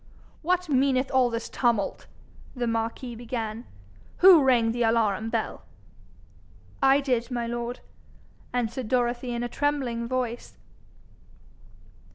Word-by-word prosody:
'What 360 +2 0
meaneth 265 -2 +2
all 260 -2 +3
this 230 -1 -4
tumult?' 235 -5 -1 0.5
the 245 -1 -2
marquis 230 +2 -2
began. 230 -1 -5 0.5
'Who 355 -5 +8
rang 240 -4 +3
the 240 +1 -3
alarum 225 -2 +1
bell?' 225 -1 -3 1.2
'I 270 +1 +5
did, 250 -4 -1
my 240 -2 -2
lord,' 240 +1 -4 0.7
answered 245 0 -2
Dorothy 245 0 0
in 240 0 -2
a - - -1
trembling 255 -4 -1
voice. 245 -1 -3
240 Hz, 115 wpm, -26 LUFS, 230-260 Hz, 1.2 s, Who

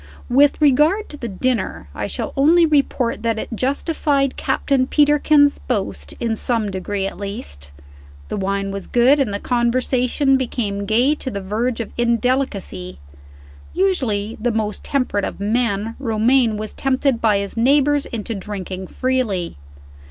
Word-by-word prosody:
With 280 +3 +4
regard 305 +8 +3
to 295 - -7
the 240 - -5
dinner, 240 +4 -2
I - - -3
shall - - -4
only 325 +5 +5
report 280 -5 +1
that 230 -1 0
it - - -5
justified 275 +1 0
Captain 265 -1 0
Peterkin's 295 0 +4
boast, 100 - -3
in 230 -2 -1
some 220 -2 -1
degree 195 +1 -3
at 195 - -5
least. 70 - -6 0.6
The - - -4
wine 195 0 -2
was 195 -1 -6
good, 255 +4 +4
and 260 -7 +1
the 200 - -3
conversation 250 +3 +1
became 205 -6 -3
gay 240 +7 +3
to 290 -3 -5
the 200 - -4
verge 225 +5 -2
of 225 - -7
indelicacy. 235 -6 -1 0.8
Usually 240 - 0
the 240 +1 +1
most 215 -2 -2
temperate 255 -7 -1
of - - -4
men, 215 0 0
Romayne 230 -1 +2
was 215 0 -5
tempted 270 -2 0
by 215 -3 +3
his 200 0 -4
neighbors 285 +4 +3
into 230 0 -4
drinking 190 -2 -6
freely. 240 - -1
235 Hz, 145 wpm, -20 LUFS, 205-270 Hz, 0.8 s, only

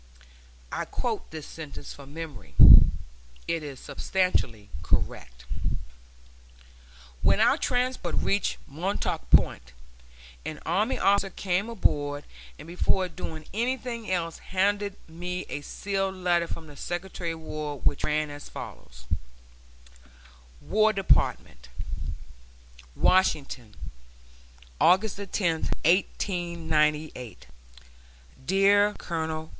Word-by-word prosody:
[*] - - -26
I - - -2
quote - - -3
this 155 -2 -7
sentence 155 -4 -8
from 140 -1 -12
memory; 160 -1 -8 0.9
it 165 -1 0
is 140 -4 -7
substantially 120 - -1
correct. 60 0 -2 1.8
When - - +4
our - - +5
transport 250 +1 -1
reached 200 0 +1
Montauk 175 +8 -2
Point, 65 0 +3 0.7
an 155 -1 -5
army 210 +10 +1
officer 195 0 +3
came 190 +3 -1
aboard 145 -9 0 0.3
and - - -11
before 180 +2 +1
doing 160 -1 -7
anything 235 0 -2
else 170 -3 -1
handed 200 +1 0
me 180 +2 -5
a 145 - -4
sealed 195 +5 -2
letter 175 -2 +1
from 165 - -6
the 145 -2 -12
Secretary 175 +1 -4
of 160 - -9
War 150 -2 -5
which 140 - 0
ran 150 0 0
as 145 0 -9
follows: 60 -1 -10 1.6
WAR 215 +1 +3
DEPARTMENT, 65 - +1 1.3
WASHINGTON, 140 - +2 1.1
August 190 +4 +4
10, 200 - -5 0.6
1898. 160 - 0 1.0
DEAR 200 +2 +4
COL. 160 -2 -3
170 Hz, 100 wpm, -27 LUFS, 150-195 Hz, 1.8 s, our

